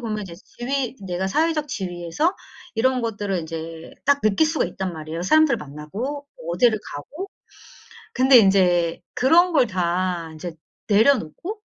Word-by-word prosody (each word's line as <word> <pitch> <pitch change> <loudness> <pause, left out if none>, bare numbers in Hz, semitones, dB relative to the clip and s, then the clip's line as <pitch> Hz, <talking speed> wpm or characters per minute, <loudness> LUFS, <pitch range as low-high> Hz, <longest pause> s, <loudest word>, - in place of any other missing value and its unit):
보면 215 -3 -3
이제 180 -4 -8
지위 255 +7 -4
내가 180 +1 -2
사회적 305 +7 0
지위에서 180 - -2 0.4
이런 255 +3 +2
것들을 205 -4 -2
인제 165 0 -7
딱 285 0 +3
느낄 215 +9 +3
수가 310 0 0
있단 190 -2 -4
말이에요, 160 +1 -6
사람들을 310 +5 +4
만나고 195 - -6 0.3
어디를 235 -4 +3 0.2
가고. 310 - -7 0.8
근데 260 +1 +6
인제 180 -5 +3
그런 340 +7 +4
걸 270 -5 +4
다 180 -3 -1
인제 160 +2 -7 0.3
내려놓고 255 - +2
205 Hz, 300 characters per minute, -23 LUFS, 175-275 Hz, 0.8 s, 근데